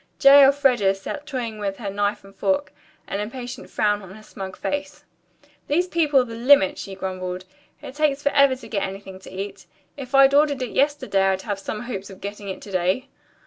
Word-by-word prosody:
J. 280 0 +8
Elfreda 265 -8 +4
sat 280 +9 -7
toying 235 -6 -4
with 195 -1 -3
her 200 -4 -5
knife 205 +1 -1
and 195 0 -16
fork, 285 +7 0 0.3
an 200 - -4
impatient 245 +4 -6
frown 210 -1 +1
on 190 -1 -11
her 215 - -13
smug 190 -3 -8
face. 290 0 -4 0.6
"These 350 +5 +1
people 300 -6 +3
are - - -2
the 230 - -9
limit," 235 -3 +4
she 195 - -7
grumbled. 185 -1 -5 0.4
"It - - -8
takes 290 -1 0
forever 280 -2 +4
to 260 - -12
get 200 -3 -2
anything 195 -1 -6
to - - -13
eat. 195 +2 -7 0.3
If 275 -1 -5
I'd 275 0 +7
ordered 285 -2 +3
it 245 - -5
yesterday, 265 -9 +1
I'd 190 0 0
have 205 -3 -3
some 210 +2 -5
hopes 205 -5 -6
of 190 - -12
getting 200 0 -7
it 190 - -6
to 205 - -10
day." 185 +9 0
220 Hz, 200 wpm, -23 LUFS, 195-275 Hz, 0.6 s, J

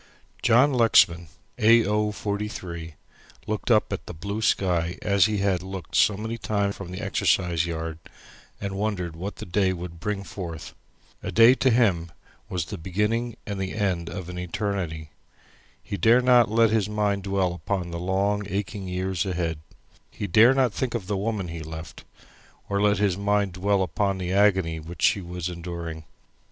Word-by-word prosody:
John 130 +5 +4
Lexman 90 -8 +4 0.3
A. 115 +1 +6
O. 105 +1 +1
43 95 -6 -5 0.5
looked 110 +2 -3
up 110 -3 +3
at - - -6
the - - -7
blue 100 +6 -4
sky 90 -5 +1
as 100 -1 +4
he 105 -1 -1
had 95 -3 +1
looked 95 -1 -7
so 105 - +4
many 110 +2 -4
times 100 -2 -1
from 100 -3 -8
the 90 - -6
exercise 85 -3 +1
yard, 80 -1 -4 0.6
and 100 -1 -4
wondered 95 -5 -2
what 95 +5 -5
the - - -8
day 95 +1 +1
would 85 -2 -7
bring 100 +2 -3
forth. 85 -5 -7 0.5
A - - -4
day 115 +3 +7
to 130 0 +2
him 100 -9 +2 0.4
was 90 -3 -2
the - - -7
beginning 105 +7 -1
and 100 -2 -4
the 95 +1 -3
end 95 -5 -1
of 95 -3 -6
an 90 0 -6
eternity. 90 -4 -3 0.7
He 100 - -4
dare 115 +7 +5
not 125 -2 +5
let 115 0 +4
his 110 -2 +1
mind 105 -1 0
dwell 95 -2 0
upon 90 0 -3
the 85 - -4
long 100 +3 0
aching 100 0 -3
years 90 0 -1
ahead. 85 -4 -2 0.5
He - - -5
dare 110 +8 +6
not 130 -5 +2
think 125 -3 -2
of 110 -6 -3
the 100 +2 -2
woman 100 -2 -2
he 85 0 -6
left, 80 +1 -9 0.6
or 100 0 0
let 105 0 +3
his 100 -2 +1
mind 100 -1 +1
dwell 95 +1 +1
upon 100 +1 -1
the 90 0 -3
agony 95 -5 +3
which 80 +1 -8
she 100 - +4
was 90 0 -5
enduring. 85 -2 -6
95 Hz, 175 wpm, -25 LUFS, 85-105 Hz, 0.7 s, day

